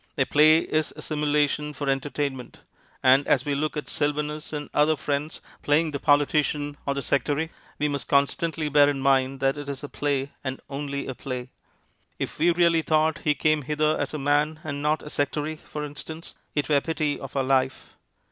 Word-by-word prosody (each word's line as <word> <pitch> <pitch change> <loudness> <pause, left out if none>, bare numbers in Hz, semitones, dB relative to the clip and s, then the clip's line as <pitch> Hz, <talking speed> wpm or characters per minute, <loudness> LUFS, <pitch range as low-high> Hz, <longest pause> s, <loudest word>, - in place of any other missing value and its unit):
A - - +3
play 155 +2 +6
is 155 -1 -1
a - - -8
simulation 150 0 0
for 145 +1 -5
entertainment, 135 -1 -2 0.4
and 135 +2 +5
as 130 0 +3
we 145 - 0
look 150 +2 -1
at 150 - -4
Sylvanus 150 +1 -2
and 150 -1 -4
our - - +3
other 155 +1 +4
friends 145 +2 -3 0.2
playing 155 +2 +2
the 140 - -3
politician 145 0 +2
or 140 - 0
the 140 - -3
sectary, 145 +5 0 0.3
we 150 - +1
must 140 -2 -3
constantly 150 +3 +1
bear 145 0 +5
in 140 -1 -2
mind 135 0 +2
that 135 +1 +2
it 145 -1 -6
is 140 0 -5
a - - -4
play, 140 -1 -1
and 130 -1 -3
only 140 0 -3
a 130 - -4
play. 125 -1 -6 0.7
If - - -5
we 165 +3 +4
really 170 -1 +4
thought 155 0 +2
he 150 -2 +1
came 155 0 +2
hither 150 +2 +1
as - - -1
a 155 - -3
man 145 +2 +1
and 145 -2 -4
not 150 +1 +1
a 150 - -8
sectary, 150 +2 -2
for 150 0 -6
instance, 155 +3 -8 0.2
it 145 - 0
were 145 -2 +3
pity 155 -2 -1
of 135 0 -9
our 135 - +2
life. 130 0 0
145 Hz, 195 wpm, -25 LUFS, 140-155 Hz, 0.7 s, play